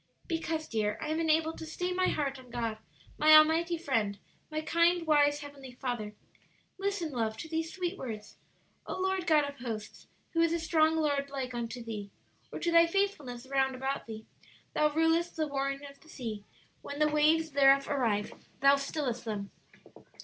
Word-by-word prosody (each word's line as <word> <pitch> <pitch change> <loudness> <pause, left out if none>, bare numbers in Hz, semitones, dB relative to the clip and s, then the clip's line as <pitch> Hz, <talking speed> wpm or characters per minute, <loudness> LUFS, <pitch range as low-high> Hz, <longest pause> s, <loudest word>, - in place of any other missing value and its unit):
"Because, 325 -2 -2
dear, 210 -2 -1
I 305 - -4
am 315 +1 0
enabled 320 0 +1
to - - -6
stay 360 +3 -2
my 370 0 +2
heart 275 -3 -1
on 255 -1 -15
God, 230 -2 -3 0.4
my 310 +1 +8
Almighty 325 +2 +5
Friend, 225 -11 -1 0.3
my 310 0 -2
kind, 335 +2 +2
wise, 290 -1 +3
Heavenly 280 -3 -10
Father. 240 -5 -4 0.6
Listen, 390 -5 -2
love, 225 -4 -2
to - - -6
these 325 +1 -2
sweet 370 0 -3
words: 215 -5 -7 0.5
'O - - -4
Lord 380 -1 -1
God 310 -3 +5
of 285 0 -5
hosts, 225 -4 -6 0.3
who 330 - +2
is 335 0 +3
a 340 - 0
strong 320 0 +3
Lord 285 -3 0
like 265 -2 -4
unto 240 0 -4
Thee? 210 -3 -6 0.4
or - - -5
to 340 - +1
thy 335 0 +6
faithfulness 320 -10 -1
round 265 -1 +1
about 265 0 -3
Thee? 220 -1 -8 0.5
Thou 300 - +3
rulest 325 +2 +2
the 315 - 0
roaring 275 0 -2
of 280 0 -12
the 315 - -20
sea: 220 -8 -6 0.4
when 285 - -7
the 305 0 +3
waves 310 +2 +3
thereof 275 0 +5
arise, 230 -7 0 0.3
Thou 275 +1 +6
stillest 275 -4 -3
them.'" 205 -3 -4
290 Hz, 180 wpm, -30 LUFS, 250-325 Hz, 0.6 s, my